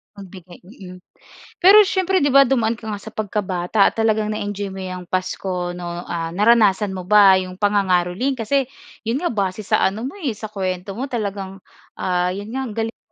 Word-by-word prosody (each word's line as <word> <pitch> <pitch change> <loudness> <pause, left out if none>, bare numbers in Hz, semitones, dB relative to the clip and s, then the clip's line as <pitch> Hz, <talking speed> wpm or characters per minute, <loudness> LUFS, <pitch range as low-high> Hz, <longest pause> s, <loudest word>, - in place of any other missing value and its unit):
Magbigay, 185 -3 -12
mm. 185 -2 -12 0.7
Pero 390 +4 +8
siyempre 375 0 +1
'di 285 -5 +1
ba 275 - +8
dumaan 235 -4 +2
ka 220 -1 -9
nga 205 - -3
sa - - -11
pagkabata 200 -2 0
talagang 215 -1 0
na-enjoy 205 -2 -4
mo 190 - -7
'yang 185 -1 -6
Pasko 180 -1 -3
'no? 175 0 -5
Ah, 165 -1 -3
naranasan 210 -1 +3
mo 185 -2 -6
ba 200 -1 +6
'yong 185 -1 -4
pangangaroling? 195 +4 +1
Kasi 260 +3 0 0.4
'yon 245 +8 -1
nga, 350 - 0
base 200 -2 -2
sa 195 - +1
ano 200 +4 -1
mo 405 - -12
eh, 280 - -2
sa 215 0 -8
kuwento 190 0 -4
mo 265 - -2
talagang, 200 -6 -5 0.4
ah, 180 0 0
'yon 205 +2 -7
nga, 265 +3 -3
ang 220 - -7
galing 225 +1 -3
205 Hz, 185 wpm, -20 LUFS, 185-225 Hz, 0.7 s, Pero